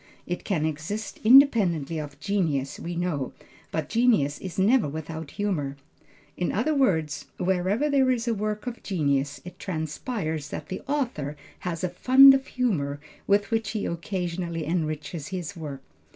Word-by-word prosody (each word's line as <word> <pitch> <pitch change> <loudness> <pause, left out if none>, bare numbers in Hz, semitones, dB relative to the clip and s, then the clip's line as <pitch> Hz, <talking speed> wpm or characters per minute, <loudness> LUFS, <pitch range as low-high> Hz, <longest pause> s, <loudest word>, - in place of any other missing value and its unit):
It 175 - -4
can 170 -7 0
exist 160 +8 -4
independently 210 - +5
of 145 -2 -7
genius 155 -7 -1
we 175 +1 -5
know, 170 -7 -2 0.4
but 160 -2 -2
genius 220 - +2
is 185 -4 -7
never 205 - +4
without 160 +1 -6
humor. 150 -10 -1 0.6
In 180 - -1
other 245 +10 +1
words, 160 - +1
wherever 190 +8 +1
there 275 -3 +3
is 240 -2 0
a 230 - +2
work 210 +1 -3
of 245 -1 -5
genius, 140 -6 0
it 180 0 -10
transpires 160 - -3
that - - -6
the 185 - -4
author 240 - -2 0.2
has 170 -2 -4
a - - +2
fund 260 +9 +8
of 270 +1 0
humor 155 - -1 0.3
with 200 +1 +2
which 225 -2 0
he 215 - -2
occasionally 170 -1 -3
enriches 155 -1 -2
his 185 0 -5
work. 150 -5 -7
180 Hz, 150 wpm, -26 LUFS, 155-215 Hz, 0.6 s, fund